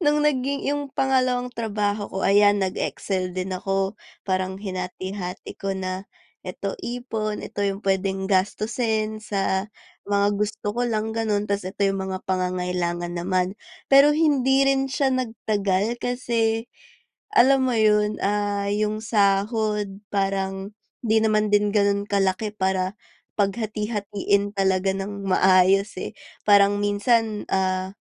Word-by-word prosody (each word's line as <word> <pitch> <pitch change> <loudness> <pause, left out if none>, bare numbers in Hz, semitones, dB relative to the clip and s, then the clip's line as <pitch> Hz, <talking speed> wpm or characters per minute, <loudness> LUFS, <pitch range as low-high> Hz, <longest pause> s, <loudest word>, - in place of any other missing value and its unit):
no'ng 295 -2 +3
naging 280 -1 0
'yung 285 0 -1
pangalawang 255 -2 +1
trabaho 210 -2 -2
ko 190 - -3
ayan 205 +1 +5
nag-excel 185 -1 -2
din 185 +1 -2
ako, 195 +2 -2 0.2
parang 185 0 -1
hinati-hati 185 -1 -5
ko 195 -1 -2
na, 185 +1 -4 0.3
ito 190 +2 -5
ipon, 225 -3 -4
ito 205 - -6
'yung 200 +1 -2
puwedeng 190 0 0
gastusin 215 +3 0
sa 195 -1 -1 0.4
mga 200 0 +2
gusto 210 0 -3
ko 245 - 0
lang 220 -1 -1
gano'n, 215 -2 0
tas 200 -1 -1
ito 195 - -12
'yung 195 0 +1
mga 190 0 -4
pangangailangan 180 -1 -1
naman. 180 +1 0 0.4
Pero 275 +2 +7
hindi 275 -4 +3
rin 270 0 +2
siya 265 0 +1
nagtagal, 220 -3 -1
kasi 230 -2 0 0.7
alam 265 -2 +6
mo 240 - 0
'yun, 210 -1 +3
ah, 205 0 0
'yung 215 +1 -1
sahod 205 -1 +1
parang 195 0 -1 0.3
hindi 220 0 +2
naman 215 -1 +2
din 205 0 +3
gano'n 200 0 +2
kalaki 200 +1 0
para 190 0 0 0.4
paghati-hatiin 205 -1 -1
talaga 190 0 +2
ng 200 0 -5
maayos, 190 +2 +4
eh, - - -5 0.4
parang 205 0 +6
minsan, 210 +1 +1
ah, 185 0 0
205 Hz, 125 wpm, -24 LUFS, 190-220 Hz, 0.7 s, Pero